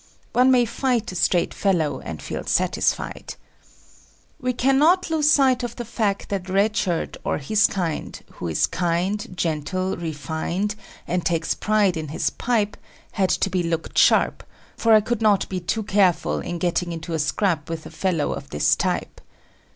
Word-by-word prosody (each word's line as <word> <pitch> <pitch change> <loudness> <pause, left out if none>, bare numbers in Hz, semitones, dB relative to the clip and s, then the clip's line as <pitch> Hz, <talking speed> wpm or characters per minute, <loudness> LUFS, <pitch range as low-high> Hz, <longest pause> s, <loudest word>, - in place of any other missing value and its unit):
One 255 +1 +5
may 250 -2 +5
fight 240 -2 -1
a - - -8
straight 175 0 +1
fellow, 175 -7 0
and - - -7
feel - - -5
satisfied. - - -1 1.0
We 255 -3 0
cannot 295 +9 +3
lose 305 -2 +3
sight 265 -4 +4
of 240 -2 -4
the 240 - -6
fact 210 -3 -2
that 190 -2 -3
Red 200 +3 +2
Shirt 175 -5 -1
or - - -1
his 205 +9 +3
kind 175 -5 -3
who 85 - -6
is 80 - +2
kind, 180 +4 -1
gentle, 170 +4 -1
refined, 165 +5 -3 0.3
and 175 0 -1
takes 165 -1 0
pride 210 -4 +1
in 155 -1 -4
his 145 - -1
pipe 215 -4 -1 0.3
had 190 -3 0
to - - +1
be 185 - +1
looked 165 -1 -3
sharp, - - +4 0.3
for 225 -1 +3
I 215 - +7
could 235 +1 -2
not 210 -3 +3
be 185 - -2
too 215 +5 -2
careful 195 -4 +2
in 175 - -4
getting 175 0 -1
into 165 0 -5
a 160 - -1
scrap 155 +1 0
with 165 -1 -4
the - - -10
fellow 175 -6 -1
of 140 - -8
this 75 - +2
type. - - -2
190 Hz, 170 wpm, -23 LUFS, 170-220 Hz, 1.0 s, I